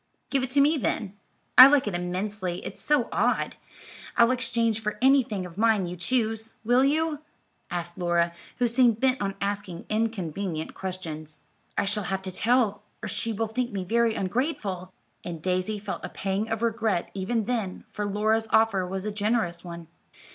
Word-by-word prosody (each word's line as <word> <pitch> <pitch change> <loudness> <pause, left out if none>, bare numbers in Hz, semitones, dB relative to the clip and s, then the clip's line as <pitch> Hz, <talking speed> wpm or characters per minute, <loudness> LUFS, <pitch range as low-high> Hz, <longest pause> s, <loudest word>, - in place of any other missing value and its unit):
"Give 275 - +2
it 255 - -2
to 280 +2 +3
me, 300 +3 +4
then. 215 -6 -1 0.5
I 255 - +14
like 280 -1 +4
it 205 - -1
immensely; 180 +1 -3
it's - - -7
so 295 -5 +2
odd. - - +1 0.6
I'll 235 +1 +6
exchange 235 -3 +1
for 210 -1 -3
anything 245 -7 +3
of 180 +2 -10
mine 220 -4 +3
you 175 +1 -5
choose. 225 +3 -1
Will 245 +3 +4
you?" 305 +1 +1 0.5
asked 175 0 -4
Laura, 170 -1 +1 0.2
who 245 - +2
seemed 235 -2 +3
bent 260 -1 +2
on 195 -1 -1
asking 200 -3 -3
inconvenient 195 -6 -2
questions. 160 -5 -6 0.3
"I - - +2
shall 210 0 -1
have 190 +1 -2
to 190 - -4
tell, 220 0 +2 0.2
or - - -2
she 230 - -2
will 225 +1 -1
think 240 +3 -2
me 195 -2 -3
very 230 +3 +2
ungrateful," 195 - -2 0.3
and 170 -2 -5
Daisy 185 +5 -1
felt 200 -1 -5
a - - -4
pang 195 +3 -2
of 225 0 -2
regret 220 -5 0
even 205 +3 -1
then, 220 -5 -2
for 210 -1 -3
Laura's 215 +2 +1
offer 205 -5 +3
was 190 +1 -4
a 210 - -1
generous 205 -5 0
one. 170 -2 -8
210 Hz, 175 wpm, -26 LUFS, 185-235 Hz, 0.6 s, I